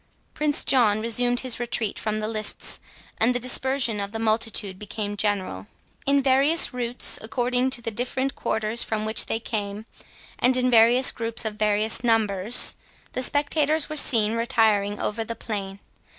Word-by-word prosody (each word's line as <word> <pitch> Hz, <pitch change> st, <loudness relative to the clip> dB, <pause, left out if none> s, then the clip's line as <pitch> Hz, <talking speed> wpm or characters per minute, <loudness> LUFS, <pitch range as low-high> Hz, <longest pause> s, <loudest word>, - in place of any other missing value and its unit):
Prince 300 Hz, -1 st, +2 dB
John 220 Hz, -5 st, +3 dB
resumed 245 Hz, +2 st, 0 dB
his 255 Hz, -2 st, -3 dB
retreat 235 Hz, -3 st, -2 dB
from 215 Hz, 0 st, -3 dB
the 215 Hz, -, -3 dB
lists, 215 Hz, -1 st, -3 dB, 0.4 s
and 245 Hz, +3 st, +2 dB
the -, -, 0 dB
dispersion 255 Hz, -2 st, +1 dB
of 200 Hz, 0 st, -4 dB
the -, -, -4 dB
multitude 220 Hz, -3 st, -1 dB
became 205 Hz, 0 st, -5 dB
general. 190 Hz, -, -2 dB, 0.4 s
In 280 Hz, 0 st, +2 dB
various 275 Hz, +4 st, +3 dB
routes, 245 Hz, 0 st, 0 dB
according 245 Hz, +3 st, -1 dB
to 245 Hz, -2 st, -1 dB
the 230 Hz, -, -3 dB
different 255 Hz, +4 st, -2 dB
quarters 220 Hz, +2 st, -2 dB
from 215 Hz, -1 st, -3 dB
which 220 Hz, 0 st, +1 dB
they 225 Hz, -, -2 dB
came, 210 Hz, -2 st, -5 dB, 0.5 s
and 255 Hz, +1 st, +3 dB
in 255 Hz, 0 st, +1 dB, 0.4 s
groups 230 Hz, -1 st, -2 dB
of 220 Hz, -, -3 dB
various 215 Hz, +2 st, +1 dB
numbers, 220 Hz, -1 st, +4 dB, 0.3 s
the 255 Hz, -, -4 dB
spectators 295 Hz, +3 st, +1 dB
were 310 Hz, -, -5 dB
seen 225 Hz, -7 st, +2 dB
retiring 215 Hz, -3 st, 0 dB
over 225 Hz, +2 st, -3 dB
the 230 Hz, +1 st, -6 dB
plain. 195 Hz, -4 st, -6 dB
225 Hz, 155 wpm, -23 LUFS, 215-250 Hz, 0.5 s, numbers